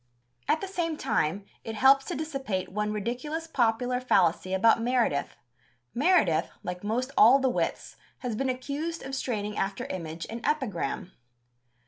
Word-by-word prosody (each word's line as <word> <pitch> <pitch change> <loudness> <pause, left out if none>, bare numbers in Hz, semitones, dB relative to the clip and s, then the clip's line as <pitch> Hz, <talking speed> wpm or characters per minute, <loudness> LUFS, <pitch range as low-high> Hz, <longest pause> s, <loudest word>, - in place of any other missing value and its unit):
At 315 - +2
the 390 - -3
same 335 -4 -2
time 190 - 0 0.2
it 225 - -5
helps 270 +4 +5
to - - -4
dissipate 270 - -3
one 210 +2 -1
ridiculous 250 +10 -3
popular 250 -3 +1
fallacy 185 -6 +2
about 225 +4 +4
Meredith. 235 - +1 0.6
Meredith, 240 - +3
like 180 +1 -5
most 245 +6 -1
all 240 +5 +8
the 265 -1 +1
wits, - - -2 0.2
has 245 -4 -2
been 265 +4 -1
accused 285 +6 -3
of 270 - -7
straining 210 -6 -2
after 195 0 -2
image 165 -2 -5
and 230 +1 -7
epigram. 200 - -2
235 Hz, 145 wpm, -28 LUFS, 200-270 Hz, 0.6 s, all